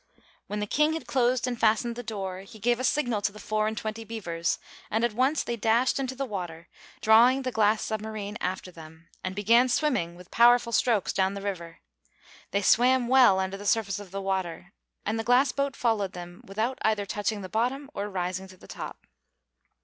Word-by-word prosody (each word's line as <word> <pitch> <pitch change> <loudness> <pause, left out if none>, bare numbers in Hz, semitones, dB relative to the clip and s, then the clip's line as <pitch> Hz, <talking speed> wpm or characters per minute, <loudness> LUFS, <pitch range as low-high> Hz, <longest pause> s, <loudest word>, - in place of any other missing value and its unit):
When 210 - -3
the 210 - -1
King 300 +8 +2
had 325 - -4
closed 250 -2 +1
and 245 -2 -3
fastened 230 +2 +2
the 245 - -5
door, 195 -5 -5
he 220 +4 -12
gave 240 +3 +1
a - - -3
signal 245 -6 +1
to 205 - 0
the 210 - -13
four 215 0 -1
and 220 0 -3
twenty 220 +1 -4
beavers, 175 -7 -2 0.3
and 220 +2 0
at 235 -2 +1
once 265 +6 +1
they 235 - -3
dashed 230 +4 +2
into 260 -1 -3
the 275 +1 -2
water, 175 -7 -6 0.3
drawing 240 +5 +5
the 255 - -2
glass 215 -1 +2
submarine 215 -1 -4
after 185 0 -3
them, 160 0 -14
and 185 0 -4
began 230 +5 +4
swimming 240 - 0
with 180 0 -15
powerful 240 0 +5
strokes 225 -4 +2
down 190 +1 +1
the - - -4
river. 170 -5 -5 0.7
They 200 0 -1
swam 245 +3 +4
well 250 -7 +6
under 190 +1 -2
the 205 +1 -7
surface 205 -3 +1
of 205 -2 -10
the 195 +1 -5
water, 190 -1 -3 0.3
and 220 +2 -1
the - - -1
glass 250 +4 +4
boat 280 -1 -2
followed 215 -5 0
them 175 0 -9
without 220 +6 -2
either 215 -2 +1
touching 205 +1 -2
the - - -5
bottom 250 +7 -1
or 205 +1 -3
rising 185 0 -3
to 185 0 -15
the - - -16
top. - - -8
215 Hz, 205 wpm, -27 LUFS, 190-240 Hz, 0.7 s, well